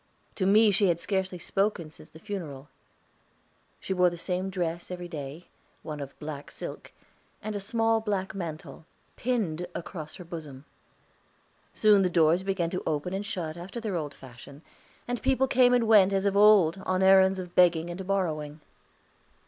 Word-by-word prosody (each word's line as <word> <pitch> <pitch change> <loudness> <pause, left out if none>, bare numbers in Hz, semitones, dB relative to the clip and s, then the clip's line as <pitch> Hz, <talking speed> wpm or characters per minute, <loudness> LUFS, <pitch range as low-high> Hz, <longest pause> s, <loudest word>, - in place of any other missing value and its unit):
To 190 - -1
me 210 +2 +6
she 200 +1 +3
had 170 -1 +1
scarcely 190 -1 -2
spoken 185 -3 -1
since - - -15
the - - -14
funeral. 160 -7 -7 1.1
She 190 - -3
wore 180 -1 +4
the 175 - -8
same 185 +2 -2
dress 175 -2 -3
each 180 -1 -7
day 150 +2 -7 0.4
one 150 -2 -6
of 140 -1 -8
black 150 -2 -7
silk - - -8 0.5
and 215 0 -4
a - - -2
small 225 +2 +1
black 200 -3 -2
mantle, 165 -3 -7 0.3
pinned 190 -9 -2
across 155 -2 -7
her 185 - -9
bosom. 155 -5 -9 1.1
Soon 210 -2 +5
the 185 - +2
doors 170 0 +3
began 190 -3 -1
to 180 - -3
open 155 +4 -2
and 195 +1 -2
shut 165 -7 -4
after 185 +7 -7
their 215 -5 -3
old 150 -4 -4
fashion, 135 +3 -13 0.4
and 245 -1 -3
people 265 0 +2
came 250 -1 +4
and 245 -2 +3
went 200 -3 +6
as 195 0 0
of 200 -1 +1
old 200 -4 +5
on 185 0 0
errands 190 0 +6
of 180 -1 -7
begging 175 -1 +3
or 185 +2 -6
borrowing. 160 -6 -2
180 Hz, 170 wpm, -27 LUFS, 160-200 Hz, 1.1 s, me